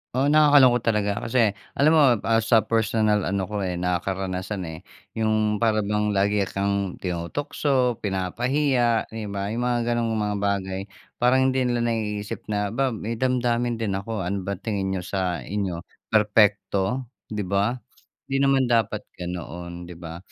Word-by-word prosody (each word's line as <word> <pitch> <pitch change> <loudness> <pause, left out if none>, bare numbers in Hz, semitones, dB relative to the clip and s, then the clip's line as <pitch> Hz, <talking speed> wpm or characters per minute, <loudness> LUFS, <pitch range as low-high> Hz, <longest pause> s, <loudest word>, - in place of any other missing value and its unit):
Oo. 140 +3 +2
Nakakalungkot 145 -6 +6
talaga 105 -2 +1
kasi 115 -3 +3 0.2
alam 150 +3 +4
mo, 155 -2 +6 0.2
ah, 115 0 +3
sa 110 -1 +3
personal 110 -2 +1
ano 95 0 0
ko, 105 +2 -4
eh, 90 -2 -2
na 90 0 0
karanasan, 95 +1 -3
eh. 80 -1 -7 0.4
Yung 110 -1 +1
para 110 -2 +2
bang 105 0 0
lagi 100 +1 +2
kang 100 -1 -1
tinutukso, 125 - -1
pinapahiya, 120 +5 +1
di 110 -2 -5
ba? 100 +1 -3
Yung 120 +2 -2
mga 120 -1 +1
gan'ong 120 -1 0
mga 105 -1 -1
bagay 95 -1 -1 0.4
parang 130 +2 +3
hindi 130 -1 +1
nila 120 -1 0
naiisip 105 -2 -3
na, 105 -1 -1
"'Ba 130 +1 0
may 110 +2 -4
damdamin 120 -2 +1
din 100 -3 -1
ako. 110 0 -4
Ano 95 +1 -3
ba 100 - 0
tingin 95 -1 -2
niyo 90 - -2
sa 90 -2 -2
inyo, 95 -4 -3 0.3
perpekto?" 105 +2 +2 0.2
Di 105 -1 -3
ba? 100 +5 +1 0.5
Hindi 135 - 0
naman 135 -1 +3
dapat 115 -3 +1
ganoon, 85 0 -6
di 90 - -8
ba? 85 -1 -8
105 Hz, 160 wpm, -24 LUFS, 95-120 Hz, 0.5 s, Nakakalungkot